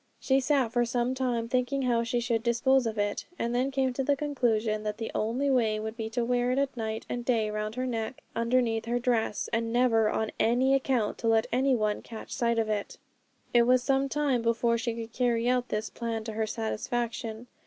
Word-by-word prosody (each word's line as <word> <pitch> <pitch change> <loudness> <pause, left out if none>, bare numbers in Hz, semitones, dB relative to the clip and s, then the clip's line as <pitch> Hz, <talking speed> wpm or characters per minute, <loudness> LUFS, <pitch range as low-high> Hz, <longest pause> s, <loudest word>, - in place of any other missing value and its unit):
She 265 0 +2
sat 265 -3 +1
for 240 -1 +3
some 240 +1 0
time 245 -3 -1
thinking 255 +3 0
how 240 -2 +2
she 235 +1 -1
should 235 -1 0
dispose 245 +2 +2
of 220 -1 -4
it, 205 0 -1
and 235 +1 -1
then 255 +2 +1
came 265 -2 0
to 270 - -1
the 285 +2 +2
conclusion 235 -7 0
that 210 0 -3
the 225 - -4
only 250 +6 0
way 220 -4 +2
would 220 +1 -5
be 225 -1 -4
to 235 +1 -1
wear 245 0 +1
it 270 +1 0
night 220 -2 -4
and 240 - -3
day 225 -3 +1
round 215 +1 -3
her 255 0 -2
neck 230 -1 -4
underneath 230 -1 +1
her 240 +1 0
dress, 235 -3 0
and 230 0 0
never 230 -3 +3
on 220 0 -1
any 250 +4 +3
account 260 -5 +1
to 230 - -2
let 225 0 +4
any 260 +2 +3
one 215 -2 0
catch 225 -2 -10
sight 235 -2 0
of 225 -1 +1
it. 210 -2 -3 0.6
It 240 -1 +5
was 250 0 +4
some 270 +1 +1
time 280 -4 +1
before 235 0 +2
she 235 0 -2
could 230 0 -7
carry 240 -2 +1
out 250 0 +1
this 210 0 -2
plan 230 -2 -3
to 220 0 -5
her 220 0 -1
satisfaction. 225 +1 -3
235 Hz, 215 wpm, -28 LUFS, 225-255 Hz, 0.6 s, It